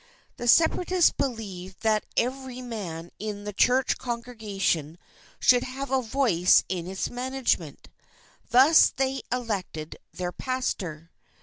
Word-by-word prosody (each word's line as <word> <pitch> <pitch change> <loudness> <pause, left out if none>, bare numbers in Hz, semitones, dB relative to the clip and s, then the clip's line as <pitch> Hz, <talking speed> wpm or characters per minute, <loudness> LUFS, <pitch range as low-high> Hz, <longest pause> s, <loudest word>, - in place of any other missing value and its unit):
The 240 - -4
Separatists 340 +5 +4
believed 195 -8 -5
that 215 -1 +1
every 255 +1 -1
man 185 -9 -6
in 210 -1 -5
the 210 0 -5
church 255 +6 +2
congregation 210 - -2 0.4
should 245 -1 +5
have 265 +2 -6
a 265 -1 +2
voice 225 -8 +3
in 180 -2 -3
its 190 +1 -3
management; 245 - -2 0.6
thus 270 +6 +7
they 270 0 -2
elected 205 -10 -4
their 180 -1 -4
pastor. 180 - -4
230 Hz, 115 wpm, -26 LUFS, 185-255 Hz, 0.6 s, thus